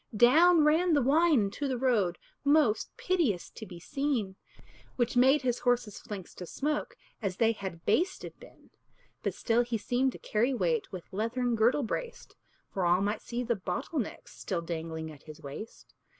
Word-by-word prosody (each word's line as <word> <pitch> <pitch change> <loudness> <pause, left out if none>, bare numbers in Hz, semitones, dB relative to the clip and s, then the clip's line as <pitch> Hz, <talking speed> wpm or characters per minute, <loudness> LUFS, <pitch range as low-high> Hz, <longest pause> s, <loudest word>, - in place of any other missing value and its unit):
Down 320 +8 +6
ran 325 +3 +3
the 290 - +4
wine 305 0 +4
into 205 +8 -2
the 260 -2 -1
road, 220 -9 +1 0.3
Most 285 -6 +3
piteous 315 - 0
to 220 - -9
be 175 -2 -10
seen, 240 - -2 0.6
Which 240 -1 0
made 265 +4 +5
his 245 -1 0
horse's 245 -4 0
flanks 195 -4 -8
to 180 - -8
smoke 300 - -2 0.2
As 190 -4 -2
they 225 -1 +4
had 190 -6 -7
basted 375 +2 0
been. - - -17 0.5
But - - -2
still 235 0 +2
he 240 -1 -1
seemed 250 +4 0
to - - -8
carry 240 +5 0
weight 470 - 0
With 185 -1 -9
leathern 235 +4 0
girdle 235 +6 +3
braced; 480 - -5 0.4
For 190 - -2
all 175 +2 +3
might 205 +2 -1
see 245 +1 -4
the 235 -1 0
bottle 190 - -3
necks 225 - -6
Still 175 -3 -3
dangling 160 -1 -5
at 145 -2 -14
his 155 -1 -12
waist. 145 +11 -9
235 Hz, 175 wpm, -30 LUFS, 195-280 Hz, 0.6 s, Down